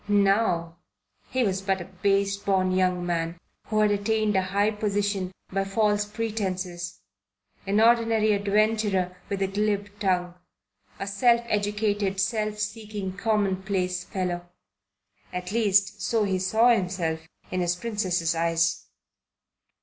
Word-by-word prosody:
Now 195 -4 +2 0.5
he 255 0 +1
was 195 -3 0
but 195 -1 0
a 175 - -6
base 195 +2 +1
born 190 -2 +1
young 180 -1 +1
man 170 0 -2 0.3
who 215 0 +1
had 210 -1 +4
attained 210 +1 +1
a 190 - +4
high 200 +3 +1
position 205 -3 -1 0.2
by 195 +1 0
false 210 +1 +1
pretences; 190 -5 -4 0.7
an 200 +2 +2
ordinary 225 -1 +4
adventurer 205 -2 +1
with 195 -1 -1
a - - +1
glib 205 +1 -1
tongue; 180 -3 0 0.7
a - - -3
self 235 +4 +3
educated, 205 -2 0
self 215 +1 0
seeking, 210 -2 -4
commonplace 190 -3 0
fellow. 175 -2 -3 0.8
At 180 +1 -5
least, 205 -2 +2
so 220 +2 +1
he 190 -2 0
saw 220 +6 +4
himself 180 -5 -1 0.3
in 185 - 0
his 175 0 +1
Princess's 180 -5 -1
eyes. 165 0 0
200 Hz, 125 wpm, -26 LUFS, 185-210 Hz, 0.8 s, had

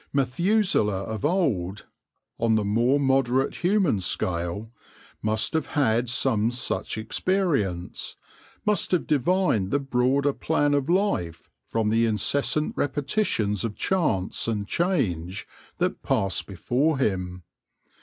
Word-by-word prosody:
Methuselah 140 - +1
of 110 0 -5
old, 110 - 0 0.5
on 115 -1 +2
the 110 -2 +1
more 120 +7 +2
moderate 135 -1 +1
human 180 - +2
scale, 90 +4 -2 0.5
must 110 +3 0
have 160 - 0
had 120 -5 +1
some 115 -3 +2
such 120 -2 -2
experience 110 - -1 0.2
— - - -28
must 210 -1 +1
have 180 - +2
divined 150 - +1
the 140 - +2
broader 135 +1 +1
plan 145 -1 +1
of 145 +1 0
life 175 - 0 0.2
from 110 -2 0
the 115 +1 +3
incessant 140 +7 +1
repetitions 140 - 0
of 110 -3 -3
chance 150 - 0
and 105 -3 -2
change 100 - -1 0.3
that - - -1
passed 95 -1 0
before 130 - 0
him. 90 -7 -2
125 Hz, 120 wpm, -25 LUFS, 105-150 Hz, 0.5 s, the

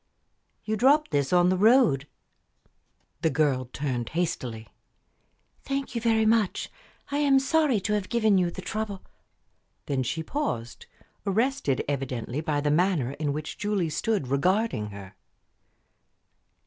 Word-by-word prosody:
"You 220 0 -1
dropped 285 +5 +4
this 140 -2 0
on 180 0 +4
the 185 - +2
road." 205 - +4 1.1
The 160 - +2
girl 135 -4 +1
turned 130 -5 -3
hastily. 125 -10 -2 0.9
"Thank 275 -1 -3
you 235 - -2
very 225 -1 +2
much. 220 -3 +1 0.4
I 285 - 0
am 280 -2 +4
sorry 275 -3 +2
to 210 +2 -1
have 205 -3 -1
given 220 -4 +3
you 180 -1 +1
the - - -8
trouble 215 -3 -4 0.4
" - - -46
Then 135 -2 -1
she 135 +6 -2
paused, 140 - -4 0.4
arrested 210 - 0
evidently 135 -1 -3
by 150 -2 -1
the 145 0 +1
manner 160 -5 +2
in 150 -2 0
which 150 +1 -5
Julie 205 -6 -1
stood 210 - -1
regarding 140 - +1
her. 100 -2 -10
180 Hz, 135 wpm, -26 LUFS, 140-220 Hz, 1.1 s, dropped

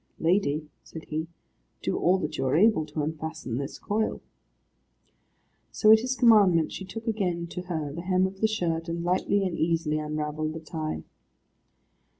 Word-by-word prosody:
"Lady," 160 -3 +1 0.2
said 160 - -10
he, 155 +1 -2 0.6
"do - - 0
all 185 +2 +3
that 155 -4 -3
you 135 -2 -1
are 130 - +2
able 195 -5 +4
to 150 0 -3
unfasten 160 -5 -4
this 140 +1 -5
coil." 215 +1 -1 1.5
So 215 - +5
at 220 - +8
his 255 +3 -2
commandment 205 -10 +5
she 190 - -6
took 225 +4 -8
again 185 -7 -1
to 180 - -4
her 155 -5 -3
the 170 - -5
hem 185 +1 +2
of 190 +1 -6
the 220 - +5
shirt, 170 -6 -2
and 170 0 -3
lightly 185 +3 +1
and 180 -3 -2
easily 160 -2 0
unravelled 155 0 -3
the 160 - -6
tie. 155 -1 -4
165 Hz, 165 wpm, -27 LUFS, 155-190 Hz, 1.5 s, at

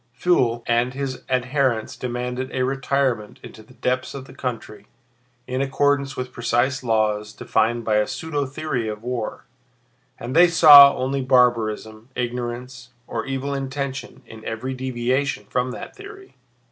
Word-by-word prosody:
Pfuel 120 -10 +2
and 120 +2 +1
his 135 -2 -4
adherents 130 -2 0
demanded 125 +1 -4
a 130 - 0
retirement 135 -4 -1
into - - -11
the 115 +4 -19
depths 130 +1 -2
of 135 -1 -7
the - - -14
country 115 -5 -6 0.6
in 130 +1 -2
accordance 140 0 0
with 125 0 -4
precise 120 +3 0
laws 105 -2 0
defined 115 +2 0
by 110 -1 +2
a 105 - +2
pseudo 145 -4 -3
theory 130 -4 -3
of 105 0 -6
war, 120 -3 -4 0.7
and 120 +4 -5
they 175 +2 +8
saw 145 -4 +9
only 135 +1 -1
barbarism, 115 -3 +1
ignorance, 125 +1 -5 0.2
or 115 0 -4
evil 135 +1 -3
intention 135 0 -5
in 110 -1 -12
every 110 +4 -4
deviation 130 -1 -1
from 125 +4 -1
that - - -8
theory. 395 -1 -12
125 Hz, 145 wpm, -22 LUFS, 120-135 Hz, 0.7 s, saw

